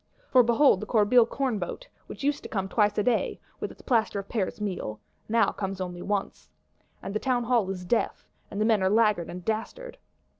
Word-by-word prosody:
For 255 - +7
behold 235 -1 +4
the 215 - -6
Corbeil 225 +1 +4
Cornboat, 250 - -3 0.2
which - - -9
used 290 +1 0
to - - -9
come 195 -2 -2
twice 210 0 +1
a 210 - +2
day, 240 -1 0 0.2
with - - -3
its - - -16
Plaster 225 -5 +1
of 195 0 -5
Paris 210 -4 -2
meal, 180 - -4 0.3
now 225 -2 +3
comes 195 -1 -4
only 180 -1 -5
once. 200 0 -3 0.5
And 195 - -5
the 215 - 0
Townhall 245 -5 +1
is 185 -2 -5
deaf; 225 +6 -1 0.2
and 200 - -5
the 215 - +2
men 220 -3 +3
are 190 - +3
laggard 210 -5 +2
and 180 0 -8
dastard! 475 - -4
215 Hz, 195 wpm, -27 LUFS, 195-240 Hz, 0.5 s, For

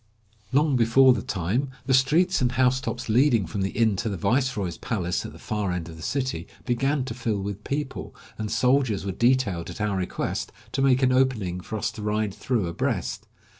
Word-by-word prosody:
Long 145 +1 +3
before 125 +2 +6
the 115 - -2
time, 100 +10 -1 0.2
the 135 - +1
streets 155 +8 +3
and 125 -1 +1
housetops 130 -1 +1
leading 115 -2 +3
from 85 +5 -4
the 95 - 0
inn 110 -2 +2
to 115 - -1
the 100 - -3
viceroy's 105 - 0
palace 90 -6 -2
at - - -10
the - - -13
far 105 -3 -2
end 90 -2 -3
of 80 - -9
the 80 - -11
city 130 - -2 0.2
began 135 +2 0
to 115 - -4
fill 115 -4 -2
with 100 +1 -5
people, 140 -1 -4 0.2
and 110 -1 -4
soldiers 125 -6 +2
were 100 - -1
detailed 120 -6 +1
at - - -8
our 105 -2 0
request 90 -1 -3 0.2
to - - -1
make 135 -1 +4
an 130 - +4
opening 120 -9 +1
for 110 - -5
us 110 +1 -1
to 110 - -9
ride 105 -1 -1
through 115 -4 -1
abreast. 85 - -2
115 Hz, 200 wpm, -25 LUFS, 100-130 Hz, 0.2 s, before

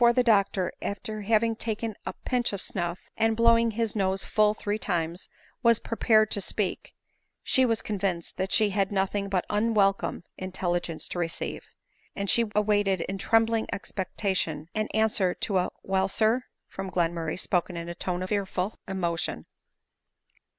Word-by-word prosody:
121 235 0 +6 0.2
the 200 - +5
doctor, 185 -2 -3
after 210 +2 -4
having 225 +2 +2
taking 225 0 -3
a - - -2
pinch 245 -4 +1
of 200 - -3
snuff, 175 -2 -3 0.2
and 225 0 +2
Mow 230 0 +6
ed 230 -1 +1
his 225 -1 -1
nose 190 -1 0
full 210 0 +3
three 210 0 -2
times, 175 -2 -2 0.3
was 235 -2 +5
prepared 220 -2 +2
to 200 - +3
speak, 195 0 -2 0.5
she 260 -1 +4
was 225 -1 0
convinced 190 -5 -2
that 190 +1 -2
she 215 -2 +4
had 195 0 0
nothing 195 0 0
but 185 -2 0
unwelcome 205 -4 +1 0.2
in 185 0 -5
telligence 175 -3 -1
to 175 - -4
receive; 165 -1 -2 0.5
and 200 0 +1
she 235 - +5
awaited 205 -3 +2
in 195 +2 -4
trembling 225 +1 +2
ex* 205 - -4
pectation 185 -6 -1
an 215 0 -1
answer 215 -4 +1
to 195 -3 0
a 180 - 0
" - - -52
Well, 190 0 +1
sir," 225 +5 +2 0.2
from 195 0 -6
Glenmurray 170 -2 -1
spoken 180 -2 0
in 170 0 -5
a 170 - -4
tone 180 0 -3
of 185 - -5
fearful 195 -1 -2
emotion. 175 -4 -2
200 Hz, 170 wpm, -27 LUFS, 185-220 Hz, 0.5 s, 121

